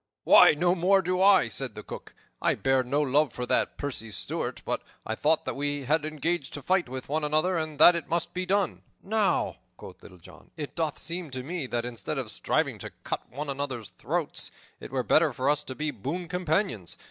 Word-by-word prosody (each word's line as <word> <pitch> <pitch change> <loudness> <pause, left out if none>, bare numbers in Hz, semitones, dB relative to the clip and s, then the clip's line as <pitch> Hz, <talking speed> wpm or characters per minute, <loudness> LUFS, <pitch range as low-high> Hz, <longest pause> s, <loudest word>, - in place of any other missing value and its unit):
"Why, - - +8
no 175 +3 +3
more 190 +2 +3
do 180 +1 0
I," 195 -8 +6
said 110 - -3
the - - -7
Cook. - - -9 0.3
"I - - +2
bear 135 -1 +2
no 140 +4 0
love 145 0 +2
for 125 - -4
that - - +1
pursy 130 -6 -4
Steward, 100 - -3
but - - -1 0.2
I 110 - -2
thought 155 +7 +1
that - - -3
we 145 0 -1
had 150 +3 +1
engaged 155 0 -1
to 145 - -6
fight 185 -7 +1
with 130 0 -6
one 155 +2 -1
another 155 +5 +1
and 155 -2 -2
that 175 +4 +9
it 170 - -4
must 170 +1 -1
be 185 - -1
done." 195 +1 0 0.2
"Now," 215 0 +1 0.2
quoth - - -12
Little 90 - -14
John, 85 - -16
"it 150 -2 -5
doth 160 -4 -1
seem 170 0 -5
to 130 -1 -5
me 160 -1 -4
that 120 -1 -2
instead 115 -5 -4
of - - -3
striving - - 0
to - - -6
cut - - -4
one 145 +5 -5
another's 135 -6 -4
throats, - - -3 0.3
it - - -9
were 130 -1 -1
better 155 +6 +3
for 130 +3 -2
us 150 0 0
to 130 - -6
be 150 +1 -2
boon 170 - -4
companions. 160 - -1
150 Hz, 215 wpm, -27 LUFS, 130-175 Hz, 0.3 s, that